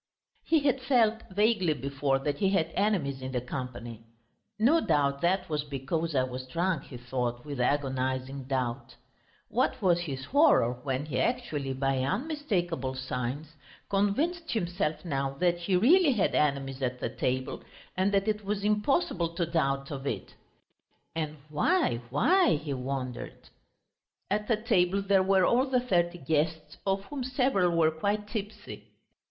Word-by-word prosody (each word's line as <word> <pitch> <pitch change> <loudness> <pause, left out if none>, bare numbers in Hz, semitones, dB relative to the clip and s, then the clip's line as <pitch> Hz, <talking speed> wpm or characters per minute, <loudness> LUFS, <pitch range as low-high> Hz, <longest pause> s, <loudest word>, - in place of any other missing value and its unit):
He 320 -2 +3
had 270 -2 +1
felt 230 -4 +3
vaguely 200 -4 +2
before 135 +1 0
that 140 +1 -2
he 195 - +3
had 165 -4 +1
enemies 170 -11 0
in 130 0 -5
the 125 - +1
company. 120 -2 -7 0.5
"No 275 +10 +4
doubt 140 -1 +1
that 185 +2 +1
was 150 -2 -1
because 145 +3 -3
I 130 - +3
was 130 0 -5
drunk," 170 +2 -1
he 125 - -9
thought 120 0 -3
with 145 -3 -5
agonising 130 0 -1
doubt. 125 -2 -3 0.5
What 250 +3 +1
was 180 -4 +3
his 135 -6 -5
horror 280 - +4
when 135 +1 -2
he 150 -4 -2
actually, 155 - -1
by 135 0 0
unmistakable 175 - -1
signs, 130 +3 -4 0.4
convinced 290 - 0
himself 175 -6 -2
now 135 -4 -1
that 175 +3 +1
he 180 +2 0
really 290 - +5
had 210 - +1
enemies 140 -2 0
at 125 -1 -2
the - - -2
table, 130 +1 -2 0.3
and 190 +2 +2
that 200 +1 +1
it 210 -1 0
was 200 0 -2
impossible 210 - +1
to 170 - 0
doubt 140 -4 -1
of 140 -1 -5
it. - - -4 0.8
"And 155 -1 -3
why 155 - +1
why?" 340 - +4
he 145 -1 -4
wondered. 130 -1 -5 0.8
At 210 +1 0
the 225 - +2
table 200 -4 +2
there 195 -1 +4
were 190 -1 +4
all 255 +7 +3
the 260 -1 +2
thirty 175 -8 +1
guests, 155 0 -1
of 195 0 +1
whom 275 +4 -5
several 250 -10 +1
were 160 -1 +4
quite 205 +6 -1
tipsy. 210 -1 -6
165 Hz, 155 wpm, -29 LUFS, 135-205 Hz, 0.8 s, really